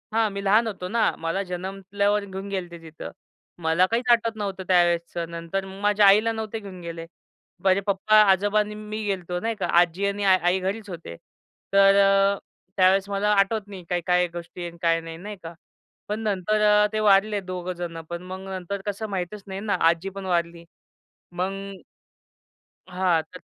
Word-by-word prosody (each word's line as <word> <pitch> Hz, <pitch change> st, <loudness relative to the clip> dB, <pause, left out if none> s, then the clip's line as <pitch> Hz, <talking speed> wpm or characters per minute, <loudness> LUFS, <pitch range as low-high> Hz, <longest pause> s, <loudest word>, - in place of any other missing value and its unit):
हां, 225 Hz, -1 st, +3 dB
मी 200 Hz, 0 st, -5 dB
लहान 215 Hz, +4 st, +4 dB
होतो 190 Hz, -4 st, -5 dB
ना, 230 Hz, +1 st, +2 dB
मला 165 Hz, +4 st, -2 dB
जन्मल्यावर 195 Hz, +3 st, -2 dB
घेऊन 195 Hz, 0 st, -7 dB
गेले 190 Hz, -3 st, -3 dB
ते 170 Hz, -, -8 dB
तिथं. 160 Hz, -1 st, -9 dB, 0.5 s
मला 165 Hz, +3 st, +3 dB
काहीच 240 Hz, +2 st, 0 dB
आठवत 230 Hz, -1 st, +2 dB
नव्हतं 195 Hz, -2 st, -4 dB
त्यावेळेसचं. 175 Hz, -1 st, +1 dB
नंतर 170 Hz, +3 st, -4 dB
माझ्या 205 Hz, +2 st, +2 dB
आईला 215 Hz, +3 st, +5 dB
नव्हतं 220 Hz, 0 st, -4 dB
घेऊन 195 Hz, -3 st, -10 dB
गेले. 165 Hz, -1 st, -7 dB, 0.6 s
माझे 190 Hz, 0 st, +4 dB
पप्पा, 200 Hz, +2 st, +2 dB, 0.2 s
आजोबा 205 Hz, +2 st, +2 dB
आणि 210 Hz, 0 st, -2 dB
मी 215 Hz, +1 st, -6 dB
गेलतो 180 Hz, -3 st, -2 dB
नाही 225 Hz, +3 st, -2 dB
का. 205 Hz, -, -2 dB
आज्जी 175 Hz, +3 st, +1 dB
आणि 200 Hz, +1 st, -1 dB
आई 185 Hz, -1 st, +3 dB
घरीच 200 Hz, +3 st, -4 dB
होते. 165 Hz, -, -8 dB, 0.6 s
तर 195 Hz, 0 st, +6 dB
अ, 195 Hz, 0 st, +4 dB, 0.4 s
त्यावेळेस 190 Hz, +1 st, +4 dB
मला 200 Hz, +1 st, 0 dB
आठवत 205 Hz, +1 st, +1 dB
नाही 195 Hz, -3 st, -9 dB
काय-काय 180 Hz, 0 st, +1 dB
गोष्टी 175 Hz, +1 st, -8 dB
आहेत, 170 Hz, 0 st, -7 dB
काय 165 Hz, -1 st, +3 dB
नाही, 165 Hz, 0 st, -8 dB
नाही 205 Hz, +4 st, -7 dB
का, 165 Hz, +1 st, -7 dB, 0.5 s
पण 210 Hz, +1 st, -3 dB
नंतर 210 Hz, +1 st, +3 dB
ते 215 Hz, -, 0 dB
वारले 210 Hz, 0 st, +4 dB
दोघं 185 Hz, -1 st, -5 dB
जणं. 170 Hz, -2 st, -6 dB
पण 170 Hz, 0 st, -5 dB
मग 185 Hz, +1 st, -7 dB
नंतर 190 Hz, +1 st, -5 dB
कसं 210 Hz, +1 st, -4 dB
माहीतच 195 Hz, +1 st, -4 dB
नाही 190 Hz, 0 st, -5 dB
ना. 210 Hz, 0 st, -1 dB, 0.2 s
आजी 170 Hz, +3 st, -1 dB
पण 195 Hz, 0 st, -8 dB
वारली. 170 Hz, -2 st, -1 dB, 0.7 s
मग 195 Hz, +2 st, -4 dB, 1.1 s
हां, 180 Hz, -3 st, +1 dB
तर -, -, -14 dB
195 Hz, 170 wpm, -24 LUFS, 180-205 Hz, 1.1 s, तर